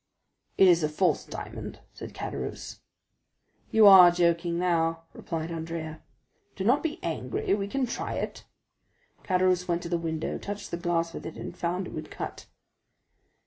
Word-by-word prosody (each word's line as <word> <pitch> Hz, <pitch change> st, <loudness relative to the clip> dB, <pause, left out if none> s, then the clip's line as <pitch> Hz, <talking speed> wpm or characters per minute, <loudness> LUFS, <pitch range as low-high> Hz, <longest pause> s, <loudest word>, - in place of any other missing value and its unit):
"It 190 Hz, -, +7 dB
is 175 Hz, -2 st, +5 dB
a 155 Hz, -, +1 dB
false 180 Hz, +5 st, +1 dB
diamond," -, -, -7 dB, 0.2 s
said -, -, -9 dB
Caderousse. -, -, -6 dB, 0.9 s
"You 220 Hz, -1 st, +5 dB
are 190 Hz, -3 st, +10 dB
joking 170 Hz, 0 st, +1 dB
now," 165 Hz, -2 st, +1 dB
replied 165 Hz, 0 st, -5 dB
Andrea. 160 Hz, -1 st, -5 dB, 0.5 s
"Do 190 Hz, -, -4 dB
not 245 Hz, +8 st, +3 dB
be 320 Hz, -2 st, -3 dB
angry, 155 Hz, 0 st, -2 dB
we 200 Hz, -1 st, -1 dB
can 270 Hz, +5 st, -1 dB
try 235 Hz, -, -4 dB
it." -, -, -4 dB, 0.8 s
Caderousse 185 Hz, -1 st, +2 dB
went 170 Hz, -1 st, -1 dB
to -, -, -5 dB
the 170 Hz, -1 st, 0 dB
window, 160 Hz, -1 st, -3 dB
touched 205 Hz, 0 st, -6 dB
the 170 Hz, -, -2 dB
glass 170 Hz, -1 st, -1 dB
with -, -, -6 dB
it, 160 Hz, -, -8 dB
and -, -, -7 dB
found 180 Hz, +2 st, -2 dB
it -, -, -9 dB
would 155 Hz, 0 st, -6 dB
cut. -, -, -7 dB
170 Hz, 160 wpm, -27 LUFS, 165-185 Hz, 0.9 s, are